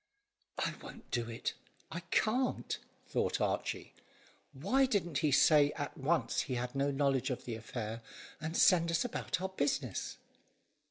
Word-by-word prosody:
"I -, -, 0 dB
won't -, -, -11 dB
do 120 Hz, -1 st, -1 dB
it, 115 Hz, -, -3 dB, 0.4 s
I 165 Hz, -, -3 dB
can't," 250 Hz, +4 st, +1 dB, 0.3 s
thought -, -, 0 dB
Archy. -, -, -1 dB, 0.6 s
"Why 270 Hz, 0 st, +2 dB
didn't 175 Hz, -, 0 dB
he 150 Hz, -, +2 dB
say 145 Hz, +1 st, +6 dB
out 145 Hz, -1 st, -3 dB
at -, -, -21 dB
once 160 Hz, +5 st, +1 dB
he 130 Hz, -, -3 dB
had 125 Hz, 0 st, -2 dB
no 140 Hz, +1 st, +1 dB
knowledge 140 Hz, -1 st, +1 dB
of 125 Hz, -, -3 dB
the 120 Hz, -, -3 dB
affair, 115 Hz, 0 st, -5 dB, 0.4 s
and 160 Hz, +2 st, -3 dB
send 170 Hz, -3 st, +6 dB
us 170 Hz, +9 st, +1 dB
about 245 Hz, -, -2 dB
our 190 Hz, -, -1 dB
business?" 140 Hz, -, -1 dB
145 Hz, 155 wpm, -34 LUFS, 125-170 Hz, 0.6 s, say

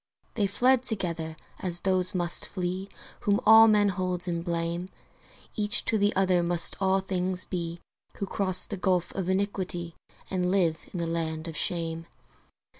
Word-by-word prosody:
They 205 Hz, -3 st, 0 dB
fled 250 Hz, +5 st, +2 dB
together, 170 Hz, -9 st, -1 dB, 0.2 s
as 175 Hz, -2 st, -2 dB
those 185 Hz, 0 st, +1 dB
must 175 Hz, -1 st, +3 dB
flee 185 Hz, +1 st, -4 dB, 0.3 s
Whom 205 Hz, 0 st, +1 dB
all 220 Hz, 0 st, +8 dB
men 210 Hz, -2 st, +3 dB
hold 185 Hz, -1 st, -3 dB
in 170 Hz, -1 st, -2 dB
blame; 170 Hz, +1 st, -3 dB, 0.7 s
Each 210 Hz, +2 st, +3 dB
to 220 Hz, -, +1 dB
the 205 Hz, +1 st, +2 dB
other 185 Hz, -2 st, +2 dB
must 170 Hz, -1 st, +4 dB
all 190 Hz, 0 st, +2 dB
things 185 Hz, -1 st, -2 dB
be 170 Hz, -2 st, -5 dB, 0.4 s
Who 200 Hz, -, -3 dB
cross 185 Hz, -2 st, +3 dB
the 205 Hz, -, -6 dB
gulf 185 Hz, -2 st, -1 dB
of 185 Hz, -2 st, -3 dB
iniquity 190 Hz, -3 st, -2 dB, 0.3 s
And 180 Hz, -2 st, -1 dB
live 175 Hz, -4 st, +1 dB
in -, -, -6 dB
the 170 Hz, -, -2 dB
land 165 Hz, -1 st, -3 dB
of 165 Hz, -, -7 dB
shame. 165 Hz, 0 st, -1 dB
185 Hz, 160 wpm, -27 LUFS, 170-195 Hz, 0.7 s, all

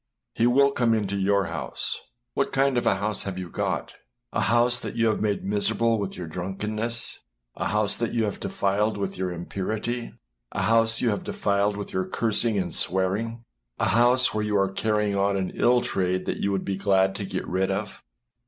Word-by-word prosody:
He 115 Hz, -, +2 dB
will 140 Hz, +3 st, +4 dB
come 120 Hz, -4 st, +2 dB
into 100 Hz, -2 st, -1 dB
your 100 Hz, 0 st, +2 dB
house. 75 Hz, -7 st, -3 dB, 0.3 s
What 140 Hz, -, 0 dB
kind 135 Hz, 0 st, +2 dB
of 120 Hz, -, +1 dB
a -, -, +4 dB
house 100 Hz, +1 st, -2 dB
have 95 Hz, -2 st, -4 dB
you 90 Hz, -3 st, -6 dB
got? -, -, -2 dB, 0.4 s
A -, -, 0 dB
house 120 Hz, +1 st, +4 dB
that -, -, -6 dB
you 115 Hz, -1 st, +2 dB
have 110 Hz, -1 st, +1 dB
made 105 Hz, -2 st, 0 dB
miserable 110 Hz, +3 st, +1 dB
with 100 Hz, -1 st, -4 dB
your 90 Hz, -, -5 dB
drunkenness 105 Hz, +7 st, -1 dB, 0.4 s
â -, -, -3 dB
a -, -, +1 dB
house 105 Hz, -1 st, +2 dB
that 115 Hz, -, -1 dB
you 115 Hz, -, 0 dB
have 105 Hz, -2 st, -3 dB
defiled 105 Hz, +2 st, 0 dB
with 100 Hz, -1 st, -3 dB
your 95 Hz, 0 st, -2 dB
impurity 100 Hz, +7 st, -3 dB
â -, -, -12 dB, 0.4 s
a -, -, -1 dB
house 115 Hz, 0 st, +3 dB
you 120 Hz, -, +2 dB
have 100 Hz, -, -3 dB
defiled 100 Hz, 0 st, 0 dB
with 100 Hz, -, -6 dB
your 95 Hz, 0 st, 0 dB
cursing 110 Hz, +1 st, +1 dB
and 90 Hz, -3 st, -2 dB
swearing 95 Hz, +5 st, +1 dB
â 115 Hz, -, -7 dB, 0.5 s
a -, -, +1 dB
house 120 Hz, +5 st, +5 dB
where 110 Hz, 0 st, -1 dB
you 105 Hz, -1 st, +1 dB
are 95 Hz, -1 st, +1 dB
carrying 105 Hz, 0 st, 0 dB
on 100 Hz, 0 st, +1 dB
an 95 Hz, -1 st, -2 dB
ill 125 Hz, 0 st, +3 dB
trade 95 Hz, -3 st, -1 dB
that -, -, -2 dB
you 100 Hz, -, -1 dB
would 95 Hz, -1 st, -1 dB
be 95 Hz, -1 st, -2 dB
glad 95 Hz, -1 st, +2 dB
to 100 Hz, -, -5 dB
get 95 Hz, -1 st, -4 dB
rid 95 Hz, +1 st, 0 dB
of. 100 Hz, +1 st, -4 dB
100 Hz, 210 wpm, -25 LUFS, 95-115 Hz, 0.5 s, house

